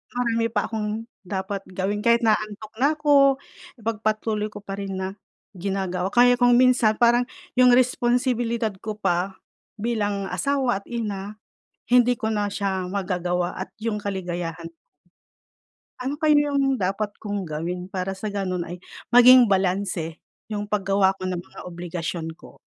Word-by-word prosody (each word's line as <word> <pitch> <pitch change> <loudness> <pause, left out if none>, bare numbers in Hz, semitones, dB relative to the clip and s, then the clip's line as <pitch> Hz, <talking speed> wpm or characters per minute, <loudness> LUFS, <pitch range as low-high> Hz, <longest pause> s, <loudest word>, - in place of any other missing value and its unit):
marami 230 -2 +1
pa 205 - 0
akong 220 0 -3 0.2
dapat 195 +1 -4
gawin, 195 +3 -2
kahit 235 +1 +5
inaantok 215 0 0
na 285 +4 +4
'ko, 280 -3 +5 0.4
ipagpatuloy 215 -1 -1
ko 205 - -7
pa 195 0 -6
rin 195 -1 -4
na 190 +1 -4 0.4
ginagawa, 190 0 -2
kaya 245 +1 +6
kung 245 0 +5
minsan 250 -4 +4
parang 240 +1 +5 0.3
yung 250 -1 +7
responsibilidad 245 -2 +1
ko 215 -1 -4
pa 190 0 0 0.4
bilang 205 -3 -1
asawa 270 -7 0
at - - -27
ina 210 -3 -4 0.6
hindi 245 0 +5
ko 220 - -1
na 205 -1 0
siya 190 -3 -2
magagawa 180 -2 -1
at 185 - -5
yung 220 -2 -1
kaligayahan 175 -4 -4 1.3
Ano 265 +3 -2
kaya 300 0 +4 0.2
yung 270 -2 +2
dapat 195 +2 -1
kong 205 -2 -3
gawin 175 +3 -4
para 190 0 -3
sa 210 +2 -5
gano'n 185 -3 -2
ay 175 - -5 0.3
maging 245 -1 +8
balanse 185 -4 0 0.2
yung 205 -1 -5
paggawa 195 -1 +2
ko 185 - -4
ng 180 -1 -3
mga - - -13
obligasyon 170 -1 -5
ko? - - -15
205 Hz, 145 wpm, -24 LUFS, 190-235 Hz, 1.3 s, maging